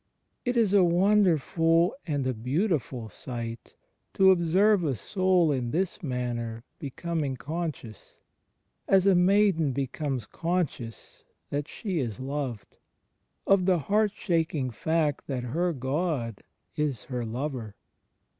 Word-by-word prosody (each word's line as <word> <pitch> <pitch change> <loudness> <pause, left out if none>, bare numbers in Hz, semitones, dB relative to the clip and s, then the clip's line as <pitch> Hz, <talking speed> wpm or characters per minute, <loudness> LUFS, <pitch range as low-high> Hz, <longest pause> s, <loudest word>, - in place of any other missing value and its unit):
It 245 0 0
is 215 -4 +3
a 200 -2 +6
wonderful 175 -2 +3
and 145 -4 -1
a 130 - 0
beautiful 130 - -1
sight 115 +1 -7 0.4
to 190 0 +7
observe 185 +3 +3
a 140 -5 0
soul 185 - +2
in 125 -4 -1
this 185 - -1
manner 120 -5 -3 0.2
becoming 145 -1 -3
conscious 145 - -6 0.4
— - - -51 0.3
as 190 -1 +4
a 195 - +6
maiden 180 -5 +3
becomes 135 -2 -2
conscious 165 - -3 0.3
that 145 +1 -2
she 190 -7 -3
is 115 -7 -3
loved 130 -6 -4 0.4
— - - -50 0.3
of 195 -2 +3
the 185 -2 +4
heart 205 +6 +1
shaking 160 -7 0
fact 155 +5 0
that 130 -3 -3
her 170 +9 0
God 135 - -2 0.3
is 145 -6 -1
her 125 -3 -4
Lover. 120 -2 -4
150 Hz, 125 wpm, -27 LUFS, 125-180 Hz, 0.4 s, to